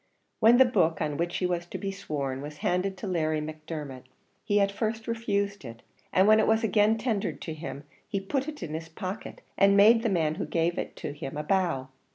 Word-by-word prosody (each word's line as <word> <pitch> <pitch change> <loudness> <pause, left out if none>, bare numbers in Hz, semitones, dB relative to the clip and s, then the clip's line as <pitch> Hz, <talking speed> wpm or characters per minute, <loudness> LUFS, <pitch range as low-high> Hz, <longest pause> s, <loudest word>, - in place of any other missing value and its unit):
When 230 +2 +6
the 260 - +8
book, 175 -10 +2
on 150 -2 -2
which 175 +1 -1
he 185 - -1
was 175 -1 -1
to - - -6
be 195 -1 -3
sworn, 140 -9 -4
was 150 +1 -8
handed 185 +2 0
to 200 - -6
Larry 155 -4 0
Macdermot, 150 -4 -7 0.4
he 205 -1 +2
at 200 0 +2
first 220 +2 -3
refused 200 -4 -1
it, 115 -2 -10 0.3
and 190 +2 +4
when 215 0 +7
it 220 - +3
was 220 +1 +3
again 215 +1 +3
tendered 220 -4 -2
to 160 - -5
him, 155 -2 -7 0.2
he 200 - -2
put 265 +8 -2
it 300 -1 -6
in 155 - -5
his 160 +1 -5
pocket, 185 +4 -6 0.2
and 200 0 +5
made 225 +3 +7
the 230 - 0
man 160 -5 +1
who - - -1
gave 170 +1 0
it - - -5
to 145 - -5
him 145 0 -6
a 150 - -2
bow. 165 -7 0
185 Hz, 220 wpm, -28 LUFS, 155-215 Hz, 0.4 s, the